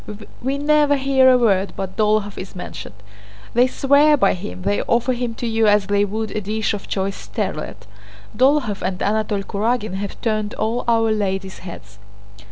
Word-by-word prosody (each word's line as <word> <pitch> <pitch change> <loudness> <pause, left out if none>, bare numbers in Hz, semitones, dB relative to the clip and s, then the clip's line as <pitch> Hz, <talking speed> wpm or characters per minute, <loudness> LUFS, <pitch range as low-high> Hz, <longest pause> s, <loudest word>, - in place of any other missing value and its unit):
We 270 +3 -1
never 295 0 +3
hear 265 -1 +4
a 255 - +6
word 200 -5 +1
but 190 -1 -5
Dólokhov 210 -1 +1
is 185 - -8
mentioned. 180 - -8 0.6
They 245 +2 +4
swear 285 +3 +4
by 200 -7 +3
him, 90 - -7
they 100 +1 0
offer 240 +2 +1
him 240 -2 -3
to 240 - -5
you 225 -1 +2
as 205 -1 +4
they 205 0 +2
would 215 +1 -4
a 215 - -3
dish 215 +2 -1
of 205 - -6
choice 195 0 -2
sterlet. 105 0 -5 0.5
Dólokhov 260 -6 +2
and 185 0 -3
Anatole 210 -1 0
Kurágin 215 +1 -1
have 195 +1 -5
turned 215 -3 -1
all 225 +3 -1
our 225 -1 +3
ladies' 195 -2 -2
heads." 105 - -11
215 Hz, 175 wpm, -20 LUFS, 195-245 Hz, 0.6 s, a